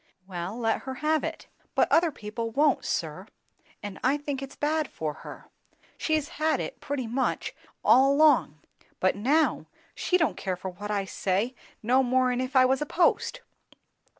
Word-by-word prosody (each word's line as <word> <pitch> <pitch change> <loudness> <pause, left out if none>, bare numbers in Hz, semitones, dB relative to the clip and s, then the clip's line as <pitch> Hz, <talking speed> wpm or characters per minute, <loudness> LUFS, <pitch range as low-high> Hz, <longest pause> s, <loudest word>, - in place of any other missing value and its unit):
"Wel 185 +3 -5
let 225 -2 0
her 265 -1 -6
have 305 +2 +1
it." 325 0 -5 0.3
"But - - +4
other 335 +1 +5
people 225 -1 -5
won't, 290 +6 +2
sir; - - -3 0.6
and 205 -2 -6
I 270 +3 +3
think 285 -2 -4
it's 275 0 -8
bad 305 0 0
for 155 -2 -4
her. - - -11 0.4
She's 310 -2 0
had 315 0 +2
it, - - -5
pretty 280 -3 -3
much, 250 +3 -1 0.3
all 260 +5 +6
along; 285 - +4 0.4
but 185 - +2
now 285 +10 +1 0.3
she 365 - +1
don't 325 -3 0
care 185 -2 -2
for 185 +1 -6
what 205 +3 -8
I 200 -2 0
say, 195 +6 -1 0.3
no 250 +4 +4
more'n 255 0 +2
if 255 +2 -4
I 255 -1 +7
was 265 +2 +2
a - - 0
post! 360 +9 +1
260 Hz, 170 wpm, -27 LUFS, 210-300 Hz, 0.6 s, I